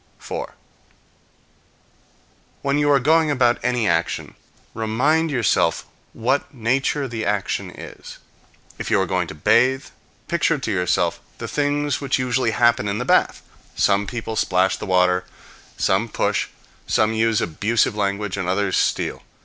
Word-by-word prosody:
4. - - -6 2.1
When 140 +1 +1
you 145 0 +2
are 140 -1 +5
going 160 +4 +3
about 125 -4 +2
any 125 -3 0
action, 85 0 -1 0.4
remind 130 +9 +1
yourself 120 -8 +1 0.3
what 130 +5 -1
nature 135 +3 0
the 115 -2 -4
action 105 -1 -1
is. - - -11 0.6
If - - -4
you - - +3
are 95 - +2
going 90 -1 -1
to - - -8
bathe, 130 - +3 0.4
picture 165 -1 +1
to 135 - -3
yourself 90 -2 0 0.2
the - - -6
things 145 -1 -1
which 140 -2 0
usually 125 -2 0
happen 120 0 +2
in 100 +1 -1
the 125 - -3
bath: - - +2 0.3
some 100 0 +2
people 115 -2 -4
splash 95 -3 +2
the - - -7
water, 90 -1 +3 0.5
some 100 +5 +1
push, - - 0 0.4
some 110 +1 +2
use 110 0 +2
abusive 105 +7 0
language, 100 -1 -2
and 95 -2 -2
others 95 0 +1
steal. - - 0
115 Hz, 140 wpm, -22 LUFS, 100-135 Hz, 2.1 s, are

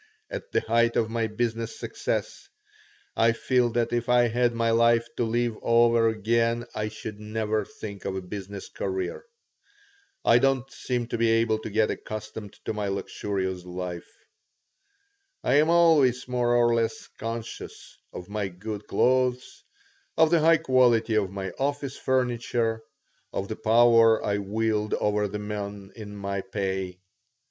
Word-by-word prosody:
At - - -6
the - - +2
height 115 +1 +2
of 110 -1 +1
my 115 -1 0
business 115 +1 -3
success - - -4 0.7
I 115 0 +4
feel 125 +1 +1
that 120 0 0
if 120 0 -1
I 120 -1 +4
had 120 +1 +2
my 115 0 +1
life 115 0 +4
to - - +1
live 120 0 0
over 115 0 +4
again 115 +2 +1
I 105 - -2
should 105 -1 -7
never 110 0 -1
think 100 -1 -9
of 95 - -2
a 95 - -3
business 100 +1 -7
career. 95 -2 -4 1.0
I 115 - +6
don't 135 -1 +1
seem 125 -2 -2
to 115 - -3
be 115 -1 +3
able 115 -1 +2
to 110 - -6
get 110 +1 +2
accustomed 110 -1 -7
to - - -2
my 105 -1 -2
luxurious 95 -1 -3
life. 90 -1 -6 1.3
I 130 - +3
am 155 +2 +3
always 155 -8 +4
more 120 -1 +1
or 120 -1 +4
less 115 -1 -1
conscious 115 0 -7 0.2
of 90 - -8
my 100 -1 -2
good 100 +3 -7
clothes, 125 0 +1 0.5
of 160 0 +5
the 170 - +5
high 165 +1 +5
quality 120 -5 +3
of 105 -3 +2
my 95 0 -5
office 140 0 -2
furniture, 120 -3 0 0.5
of 100 - -4
the 110 - -3
power 115 0 +5
I 100 0 0
wield 105 +1 -1
over 105 0 0
the 105 +1 -5
men 105 -1 -6
in 105 -2 -9
my 100 -1 -3
pay. 95 -2 -3
115 Hz, 155 wpm, -26 LUFS, 105-120 Hz, 1.3 s, I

